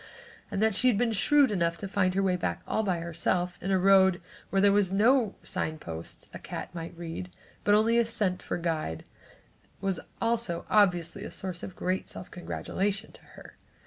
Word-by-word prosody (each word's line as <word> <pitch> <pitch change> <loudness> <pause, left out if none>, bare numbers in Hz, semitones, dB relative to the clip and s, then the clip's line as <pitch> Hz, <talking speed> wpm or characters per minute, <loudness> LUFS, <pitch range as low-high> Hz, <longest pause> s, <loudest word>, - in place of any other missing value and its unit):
And 205 0 -1
that 220 -1 +3
she 255 - +3
had 240 -5 +4
been 240 +1 +2
shrewd 280 +4 +4
enough 170 -4 0
to 200 - -5
find 185 -2 +1
her 195 - +2
way 185 -1 +2
back 180 - -3
all - - +1
by 190 -5 0
herself 175 +2 -1
in 190 - -3
a 190 - +3
road 190 -1 +5 0.3
where 195 - +1
there 200 +1 +6
were 205 +1 +5
no 225 +2 +3
sign 155 0 -3
posts 80 - -8
a - - -7
cat - - -7
might 170 0 -7
read, 170 +2 -6 0.3
but 205 - +5
only 230 +2 +4
scent 205 -5 0
for - - -3
guide 160 - -2 0.8
was 195 -3 -1 0.2
also 230 -7 -1
obviously 185 -2 +3
a 220 - -5
source 185 -3 -5
of 185 - -7
great 185 +1 -2
self - - -8
congratulation 195 +2 -3
to - - -16
her. - - -13
190 Hz, 190 wpm, -28 LUFS, 175-210 Hz, 0.8 s, there